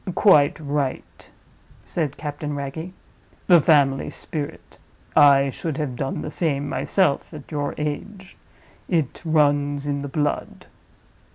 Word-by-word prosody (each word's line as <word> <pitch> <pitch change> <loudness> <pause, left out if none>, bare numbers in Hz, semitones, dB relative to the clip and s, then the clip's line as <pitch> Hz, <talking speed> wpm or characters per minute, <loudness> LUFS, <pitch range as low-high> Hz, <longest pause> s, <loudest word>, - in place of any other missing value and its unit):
"Quite 170 -5 +5
right!" 145 -3 -4 0.5
said 150 -5 -2
Captain 145 0 -5
Wragge. 145 +5 -5 0.5
"The 175 -3 +6
family 140 -3 +3
spirit. 150 -3 -6 0.4
I 140 -1 +6
should 155 +2 -4
have 145 -5 -3
done 135 +2 -3
the 150 - -5
same 145 -5 -1
myself 180 -1 0
at 150 +1 -11
your 145 -2 -2
age. 185 +6 -5 0.5
It 160 -8 -1
runs 145 -3 +1
in 140 -1 -2
the 140 - -4
blood. 145 +2 -2
145 Hz, 120 wpm, -23 LUFS, 140-160 Hz, 0.5 s, The